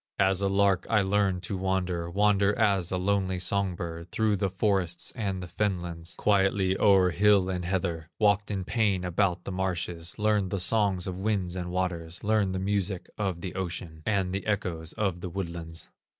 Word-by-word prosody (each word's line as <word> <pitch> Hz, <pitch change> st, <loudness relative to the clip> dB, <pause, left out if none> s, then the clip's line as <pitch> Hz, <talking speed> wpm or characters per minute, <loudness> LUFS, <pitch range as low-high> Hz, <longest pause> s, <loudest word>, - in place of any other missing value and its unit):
As 95 Hz, 0 st, +3 dB
a 100 Hz, -, +2 dB
lark 100 Hz, -1 st, +2 dB
I 105 Hz, -3 st, +4 dB
learned 95 Hz, -2 st, +1 dB
to 95 Hz, -, -3 dB
wander, 90 Hz, -2 st, -1 dB
Wander 100 Hz, +2 st, +3 dB
as 100 Hz, -5 st, +2 dB
a 90 Hz, -, 0 dB
lonely 95 Hz, 0 st, 0 dB
song 95 Hz, 0 st, 0 dB
bird, 85 Hz, 0 st, -6 dB
Through 110 Hz, -2 st, +1 dB
the 100 Hz, 0 st, 0 dB
forests 95 Hz, -3 st, 0 dB
and 100 Hz, -6 st, -2 dB
the -, -, -6 dB
fenlands, 85 Hz, -3 st, -2 dB
Quietly 95 Hz, -2 st, +2 dB
o'er 95 Hz, -3 st, +5 dB
hill 100 Hz, 0 st, +4 dB
and 90 Hz, -1 st, -3 dB
heather; 85 Hz, -3 st, -2 dB
Walked 105 Hz, -1 st, +2 dB
in 100 Hz, -2 st, -2 dB
pain 100 Hz, -5 st, +1 dB
about 90 Hz, 0 st, 0 dB
the -, -, -5 dB
marshes, 90 Hz, -2 st, -3 dB
Learned 105 Hz, -2 st, +1 dB
the 100 Hz, -, -2 dB
songs 95 Hz, -1 st, +1 dB
of 95 Hz, -1 st, -4 dB
winds 95 Hz, -3 st, -1 dB
and 90 Hz, -1 st, -4 dB
waters, 90 Hz, -2 st, -3 dB
Learned 105 Hz, -3 st, +1 dB
the -, -, -1 dB
music 95 Hz, -1 st, -1 dB
of 95 Hz, -5 st, -1 dB
the 95 Hz, -, -5 dB
ocean, 85 Hz, -3 st, -5 dB
And 95 Hz, -4 st, +1 dB
the 95 Hz, +2 st, -3 dB
echoes 90 Hz, -6 st, -2 dB
of 95 Hz, -5 st, -1 dB
the 90 Hz, -, -4 dB
woodlands. 85 Hz, -3 st, -5 dB
95 Hz, 180 wpm, -28 LUFS, 90-100 Hz, -, o'er